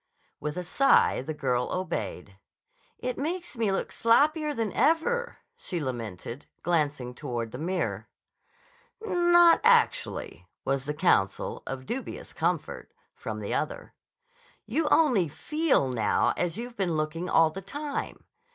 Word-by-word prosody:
With 150 Hz, +2 st, -4 dB
a 180 Hz, -, -2 dB
sigh, 275 Hz, -, +4 dB
the 135 Hz, -, -5 dB
girl 125 Hz, -4 st, 0 dB
obeyed. 100 Hz, -, -4 dB, 0.6 s
"It 250 Hz, -, -4 dB
makes 340 Hz, +3 st, -3 dB
me 225 Hz, -4 st, +1 dB
look 195 Hz, -, -2 dB
sloppier 300 Hz, +6 st, +3 dB
than 225 Hz, -4 st, -2 dB
ever," 480 Hz, +10 st, +1 dB, 0.2 s
she 190 Hz, -, -4 dB
lamented, 120 Hz, -, -5 dB, 0.2 s
glancing 145 Hz, -7 st, 0 dB
toward 120 Hz, -4 st, -4 dB
the 125 Hz, -, -7 dB
mirror. 180 Hz, +4 st, -2 dB, 1.0 s
"Not 345 Hz, -3 st, +5 dB
actually," 470 Hz, 0 st, +2 dB, 0.2 s
was 135 Hz, 0 st, 0 dB
the 150 Hz, +1 st, -3 dB
counsel—of 130 Hz, -, 0 dB
dubious 260 Hz, -, -5 dB
comfort—from -, -, -4 dB
the -, -, -3 dB
other. -, -, -3 dB, 0.7 s
"You 315 Hz, -1 st, 0 dB
only 250 Hz, -, +4 dB
feel 300 Hz, -, +1 dB
now 115 Hz, -5 st, +1 dB
as 175 Hz, 0 st, -1 dB
you've 240 Hz, +1 st, -6 dB
been 190 Hz, -5 st, 0 dB
looking 155 Hz, +3 st, -2 dB
all 165 Hz, -1 st, +4 dB
the 195 Hz, -, -7 dB
time. 290 Hz, +9 st, -5 dB
180 Hz, 125 wpm, -28 LUFS, -, 1.0 s, Not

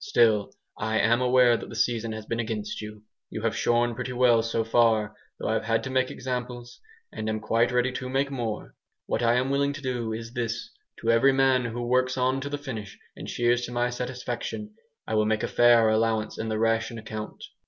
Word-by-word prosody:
Still 115 Hz, -, +3 dB, 0.3 s
I 110 Hz, +1 st, 0 dB
am 115 Hz, +3 st, +3 dB
aware 125 Hz, -1 st, +5 dB
that -, -, -8 dB
the -, -, -8 dB
season 115 Hz, -2 st, 0 dB
has 110 Hz, -1 st, -7 dB
been 115 Hz, +1 st, -3 dB
against 110 Hz, -3 st, -3 dB
you. 105 Hz, 0 st, -9 dB, 0.3 s
You 110 Hz, -, -6 dB
have 115 Hz, -, 0 dB
shorn 120 Hz, 0 st, +2 dB
pretty 125 Hz, +2 st, -4 dB
well, 120 Hz, -2 st, +4 dB
so 115 Hz, 0 st, -1 dB
far, 110 Hz, -2 st, +2 dB, 0.2 s
though -, -, -4 dB
I've 110 Hz, 0 st, 0 dB
had 115 Hz, 0 st, +1 dB
to 135 Hz, -, -5 dB
make 130 Hz, 0 st, +1 dB
examples, 125 Hz, -1 st, -5 dB, 0.3 s
and 110 Hz, -, -3 dB
am 110 Hz, 0 st, -1 dB
quite 115 Hz, +2 st, +1 dB
ready 125 Hz, +1 st, +2 dB
to 130 Hz, 0 st, -5 dB
make 135 Hz, +2 st, 0 dB
more. 115 Hz, -5 st, -4 dB, 0.3 s
What -, -, -1 dB
I 120 Hz, 0 st, +3 dB
am 130 Hz, +2 st, +1 dB
willing 140 Hz, +1 st, +1 dB
to 145 Hz, -, -8 dB
do 120 Hz, -3 st, -2 dB
is 115 Hz, +1 st, -6 dB
this: 115 Hz, -1 st, -3 dB, 0.3 s
to 115 Hz, -, +2 dB
every 130 Hz, +4 st, +5 dB
man 130 Hz, -2 st, +3 dB
who 120 Hz, +1 st, -4 dB
works 130 Hz, +1 st, +1 dB
on 130 Hz, +1 st, +1 dB
till 140 Hz, -, -4 dB
the 145 Hz, -, -3 dB
finish 115 Hz, -8 st, -7 dB, 0.2 s
and -, -, -8 dB
shears 120 Hz, 0 st, +1 dB
to -, -, -9 dB
my 120 Hz, 0 st, 0 dB
satisfaction, 125 Hz, -, -5 dB, 0.3 s
I -, -, -4 dB
will 110 Hz, -1 st, +2 dB
make 110 Hz, 0 st, 0 dB
a -, -, 0 dB
fair 120 Hz, -2 st, +5 dB
allowance 110 Hz, 0 st, 0 dB
in 110 Hz, -, -3 dB
the 110 Hz, -, -1 dB
ration 115 Hz, +1 st, 0 dB
account. 110 Hz, -1 st, -7 dB
120 Hz, 215 wpm, -26 LUFS, 110-125 Hz, 0.3 s, aware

